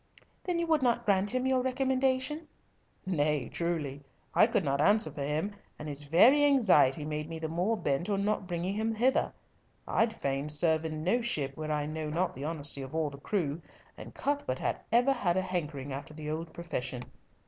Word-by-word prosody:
"Then 360 Hz, -2 st, 0 dB
you 340 Hz, -, 0 dB
would 320 Hz, -3 st, +2 dB
not 240 Hz, -2 st, +1 dB
grant 200 Hz, -1 st, +3 dB
him 255 Hz, 0 st, 0 dB
your 260 Hz, -1 st, +2 dB
recommendation?" 260 Hz, +3 st, 0 dB, 0.6 s
"Nay, 150 Hz, -7 st, 0 dB
truly. 155 Hz, -5 st, -3 dB, 0.3 s
I -, -, +6 dB
could -, -, +1 dB
not 140 Hz, 0 st, +1 dB
answer 205 Hz, -1 st, +4 dB
for 145 Hz, -, -7 dB
him, 155 Hz, +8 st, -1 dB, 0.2 s
and 150 Hz, -, -7 dB
his 145 Hz, 0 st, -2 dB
very 235 Hz, -, +6 dB
anxiety 190 Hz, -, +4 dB
made 150 Hz, 0 st, -4 dB
me 165 Hz, -, -5 dB
the 160 Hz, 0 st, -3 dB
more 180 Hz, +8 st, 0 dB
bent 145 Hz, +2 st, -1 dB
on 200 Hz, -1 st, 0 dB
not 210 Hz, -2 st, -1 dB
bringing 175 Hz, +2 st, -2 dB
him 220 Hz, +2 st, -1 dB
hither. 250 Hz, +4 st, +2 dB, 0.6 s
I'd 225 Hz, 0 st, +1 dB
fain 140 Hz, +1 st, -2 dB
serve 160 Hz, +1 st, +3 dB
in 155 Hz, -1 st, -4 dB
no 230 Hz, +8 st, +2 dB
ship 145 Hz, -, -1 dB
where 155 Hz, 0 st, -4 dB
I 150 Hz, -1 st, 0 dB
know 155 Hz, 0 st, -4 dB
not 175 Hz, +4 st, 0 dB
the 135 Hz, +3 st, -6 dB
honesty 150 Hz, -3 st, -2 dB
of 135 Hz, +3 st, -7 dB
all 155 Hz, -2 st, 0 dB
the 140 Hz, -, -10 dB
crew, 165 Hz, -3 st, -2 dB, 0.3 s
and -, -, -11 dB
Cuthbert 285 Hz, -, -1 dB
hath -, -, -2 dB
ever 245 Hz, +4 st, +4 dB
had 185 Hz, -8 st, 0 dB
a -, -, +3 dB
hankering 150 Hz, -7 st, -4 dB
after 145 Hz, +3 st, -7 dB
the 150 Hz, -1 st, -5 dB
old 160 Hz, +1 st, -4 dB
profession." 130 Hz, -7 st, -4 dB
170 Hz, 195 wpm, -30 LUFS, 150-225 Hz, 0.6 s, I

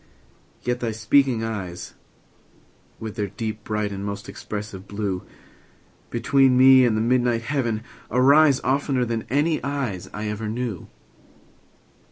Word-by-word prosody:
—yet 125 Hz, +1 st, -1 dB
thy 120 Hz, -, -2 dB
speaking 115 Hz, +2 st, +2 dB
eyes, 95 Hz, -6 st, -5 dB, 1.1 s
With 110 Hz, 0 st, -7 dB
their 105 Hz, -2 st, -1 dB
deep, 110 Hz, +2 st, -5 dB
bright, 105 Hz, -1 st, -2 dB
and 100 Hz, 0 st, -5 dB
most 100 Hz, 0 st, -5 dB
expressive 100 Hz, -1 st, -7 dB
blue, 100 Hz, -3 st, -3 dB, 0.9 s
Between 130 Hz, +2 st, +3 dB
me 130 Hz, 0 st, +7 dB
and 110 Hz, -3 st, +2 dB
the -, -, +1 dB
midnight 120 Hz, 0 st, +1 dB
heaven 115 Hz, -4 st, -1 dB, 0.3 s
arise, 140 Hz, +3 st, +5 dB
15 130 Hz, -, 0 dB
Oftener 135 Hz, -2 st, +1 dB
than 115 Hz, -1 st, -3 dB
any 150 Hz, +4 st, +1 dB
eyes 135 Hz, -10 st, -3 dB
I 105 Hz, +1 st, -4 dB
ever 105 Hz, +1 st, -3 dB
knew. 115 Hz, -4 st, -4 dB
115 Hz, 135 wpm, -23 LUFS, 105-130 Hz, 1.1 s, me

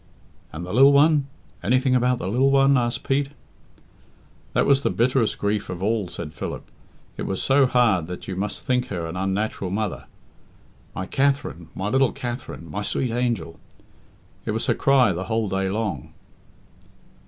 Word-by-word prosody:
"And 85 Hz, +3 st, -6 dB
the 90 Hz, -, -6 dB
lil 135 Hz, +4 st, +7 dB
one 145 Hz, 0 st, +4 dB, 0.3 s
anything 130 Hz, +3 st, +2 dB
about 125 Hz, 0 st, +2 dB
the 95 Hz, -, -5 dB
lil 125 Hz, +7 st, +3 dB
one?" 135 Hz, 0 st, +5 dB
asked 120 Hz, -2 st, 0 dB
Pete. 135 Hz, +1 st, +1 dB, 1.2 s
"That -, -, +2 dB
was 140 Hz, -1 st, +4 dB
the -, -, +1 dB
bitterest 120 Hz, -1 st, +1 dB
grief 105 Hz, 0 st, -1 dB
of 90 Hz, 0 st, -5 dB
all," 105 Hz, -2 st, 0 dB
said 85 Hz, -3 st, -7 dB
Philip. -, -, -5 dB, 0.5 s
"It -, -, -4 dB
was 95 Hz, -, -2 dB
so 135 Hz, 0 st, +4 dB
hard 110 Hz, -10 st, +2 dB
that 90 Hz, 0 st, -7 dB
you 95 Hz, -, -4 dB
must 100 Hz, +2 st, -4 dB
think 125 Hz, -1 st, +1 dB
her 85 Hz, -4 st, -4 dB
an 80 Hz, +1 st, -6 dB
unnatural 95 Hz, +1 st, -2 dB
mother. 105 Hz, +1 st, -3 dB, 0.9 s
'My 95 Hz, -, -3 dB
Katherine! 135 Hz, -, -1 dB
My 95 Hz, -, -3 dB
little 135 Hz, +1 st, +2 dB
Katherine! 120 Hz, -8 st, -6 dB
My 100 Hz, +6 st, -4 dB
sweet 120 Hz, +3 st, -1 dB
angel!' 115 Hz, -9 st, -2 dB, 0.8 s
It -, -, -2 dB
was 115 Hz, -, -2 dB
her -, -, +2 dB
cry 130 Hz, -7 st, +3 dB
the 90 Hz, +3 st, -4 dB
whole 110 Hz, -1 st, -1 dB
day 95 Hz, 0 st, -1 dB
long." 100 Hz, -, -3 dB
115 Hz, 165 wpm, -23 LUFS, 95-130 Hz, 1.2 s, lil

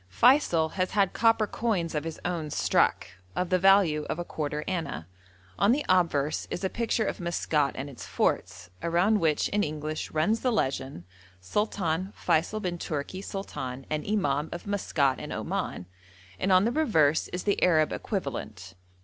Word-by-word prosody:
Feysul 175 Hz, -, +4 dB
has 185 Hz, -1 st, -1 dB
had 200 Hz, -3 st, +2 dB
copper 225 Hz, -1 st, +3 dB
coins 205 Hz, -7 st, -1 dB
of 150 Hz, 0 st, -2 dB
his 165 Hz, -, -5 dB
own 170 Hz, -4 st, -2 dB
struck, -, -, +2 dB, 0.3 s
of 180 Hz, -, -1 dB
the 185 Hz, -, +4 dB
value 190 Hz, -5 st, +4 dB
of -, -, -2 dB
a 175 Hz, -, -4 dB
quarter 150 Hz, -2 st, -3 dB
anna. 165 Hz, -, -3 dB, 0.5 s
On 200 Hz, -, +5 dB
the 285 Hz, +4 st, +1 dB
obverse 160 Hz, -5 st, +1 dB
is 180 Hz, -, -4 dB
a 190 Hz, -, 0 dB
picture 230 Hz, -1 st, 0 dB
of -, -, -3 dB
Maskat 155 Hz, -5 st, 0 dB
and 135 Hz, -, -5 dB
its 135 Hz, -4 st, -9 dB
forts, 90 Hz, -, -1 dB
around 180 Hz, +6 st, +2 dB
which 160 Hz, -4 st, +2 dB
in 205 Hz, -, +1 dB
English 155 Hz, +1 st, -4 dB
runs 165 Hz, +9 st, +1 dB
the 250 Hz, -, +1 dB
legend, 135 Hz, -, -2 dB, 0.4 s
'Sultan 185 Hz, -, -1 dB
Feysul 175 Hz, +6 st, 0 dB
bin 175 Hz, -2 st, -2 dB
Tourki 155 Hz, +5 st, -4 dB
Sultan 135 Hz, -11 st, -5 dB
and 155 Hz, -1 st, -1 dB
Imam 150 Hz, -8 st, 0 dB
of 175 Hz, -, -6 dB
Maskat 155 Hz, -10 st, 0 dB
and -, -, -7 dB
Oman,' 90 Hz, -, -3 dB, 0.5 s
and 190 Hz, -, +1 dB
on 185 Hz, +2 st, +5 dB
the 235 Hz, -, +2 dB
reverse 165 Hz, -, +2 dB
is 180 Hz, -, -5 dB
the 200 Hz, -, 0 dB
Arab 155 Hz, -4 st, +4 dB
equivalent. 110 Hz, -, -5 dB
170 Hz, 165 wpm, -28 LUFS, 150-200 Hz, 0.5 s, On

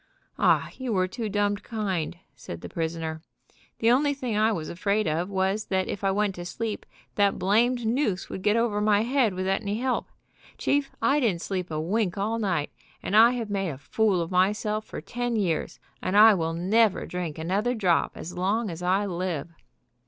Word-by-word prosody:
"Oh, -, -, +3 dB
you 260 Hz, -2 st, -3 dB
were 185 Hz, -2 st, +2 dB
too 215 Hz, +4 st, -4 dB
dumbed 205 Hz, 0 st, 0 dB
kind," 190 Hz, -7 st, -3 dB, 0.2 s
said 85 Hz, -, -8 dB
the -, -, -7 dB
prisoner. 160 Hz, -1 st, -3 dB, 0.6 s
"The 230 Hz, +1 st, +3 dB
only 285 Hz, +3 st, +3 dB
thing 250 Hz, -5 st, -3 dB
I 215 Hz, +1 st, +3 dB
was 165 Hz, -7 st, -3 dB
afraid 200 Hz, +3 st, 0 dB
of 165 Hz, +4 st, -1 dB
was 195 Hz, +2 st, 0 dB
that 190 Hz, -1 st, 0 dB
if 200 Hz, -, -5 dB
I 195 Hz, -, +3 dB
went 205 Hz, 0 st, +1 dB
to 175 Hz, -, -7 dB
sleep 220 Hz, +3 st, -4 dB, 0.3 s
that 200 Hz, -1 st, +3 dB
blamed 235 Hz, +5 st, +2 dB
noose 220 Hz, -5 st, 0 dB
would 190 Hz, -, -6 dB
get 210 Hz, +2 st, +2 dB
over 230 Hz, -3 st, +1 dB
my 210 Hz, -1 st, +3 dB
head 245 Hz, -5 st, +1 dB
without 190 Hz, +2 st, 0 dB
any 205 Hz, 0 st, -2 dB
help. 255 Hz, +2 st, -1 dB, 0.5 s
Chief, 285 Hz, -1 st, +1 dB
I 285 Hz, +2 st, +4 dB
didn't 205 Hz, -11 st, +1 dB
sleep 185 Hz, -2 st, -3 dB
a 155 Hz, -1 st, -3 dB
wink 185 Hz, +3 st, 0 dB
all 220 Hz, +3 st, -1 dB
night, 185 Hz, -9 st, -1 dB, 0.3 s
and 205 Hz, -, -1 dB
I 230 Hz, +3 st, +7 dB
have 230 Hz, -4 st, -4 dB
made 195 Hz, -2 st, -1 dB
a 140 Hz, -, -6 dB
fool 195 Hz, +6 st, +1 dB
of 165 Hz, -, -8 dB
myself 210 Hz, +4 st, +1 dB
for -, -, -7 dB
ten 245 Hz, 0 st, -3 dB
years, 180 Hz, -7 st, -1 dB, 0.2 s
and 195 Hz, -, 0 dB
I 220 Hz, +1 st, +9 dB
will 165 Hz, -3 st, -1 dB
never 200 Hz, +5 st, +2 dB
drink 175 Hz, -4 st, -4 dB
another 200 Hz, +9 st, 0 dB
drop 185 Hz, -7 st, +2 dB
as 175 Hz, -, -7 dB
long 200 Hz, +3 st, 0 dB
as 165 Hz, +1 st, -7 dB
I 190 Hz, +3 st, +1 dB
live." 170 Hz, -4 st, -3 dB
200 Hz, 195 wpm, -26 LUFS, 180-225 Hz, 0.6 s, I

